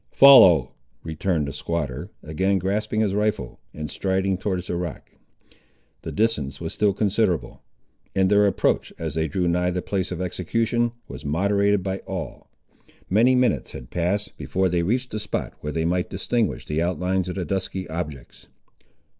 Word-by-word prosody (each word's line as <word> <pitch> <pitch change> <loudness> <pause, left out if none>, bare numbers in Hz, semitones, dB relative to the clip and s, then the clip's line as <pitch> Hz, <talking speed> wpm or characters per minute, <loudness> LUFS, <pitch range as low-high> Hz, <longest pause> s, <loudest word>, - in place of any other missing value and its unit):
"Follow," 90 - +8 0.3
returned 80 -1 -1
the 70 - -5
squatter, 85 0 -3
again 95 +6 0
grasping 105 +4 -1
his 105 -3 +1
rifle, 105 +1 -1
and 75 0 -6
striding 95 0 0
towards 95 -1 -2
the 90 - -3
rock. 85 -3 -5 0.9
The - - -6
distance 105 -11 0
was - - -5
still 105 -1 +2
considerable; 95 - 0 0.5
and 95 -1 +3
their 105 +1 +5
approach, 100 - +1
as 80 -3 -4
they 80 +1 0
drew 90 -1 -1
nigh 90 +1 +1
the 90 0 -2
place 95 -2 -2
of 90 - -4
execution, 115 +6 0
was 65 +2 -9
moderated 100 +6 +2
by 95 0 -2
awe. 90 -7 -5 0.7
Many 120 +6 +5
minutes 125 -1 +1
had - - -9
passed, 95 +4 -1
before 95 0 0
they 90 0 +1
reached 125 +8 -1
a 110 - -2
spot 105 -1 -3
where 75 - -4
they 80 +1 -1
might 90 +1 0
distinguish 105 0 -1
the 75 +1 -1
outlines 90 +1 0
of 90 - -4
the 95 -2 -2
dusky 95 0 -3
objects. 75 -6 -7
95 Hz, 165 wpm, -24 LUFS, 85-105 Hz, 0.9 s, Follow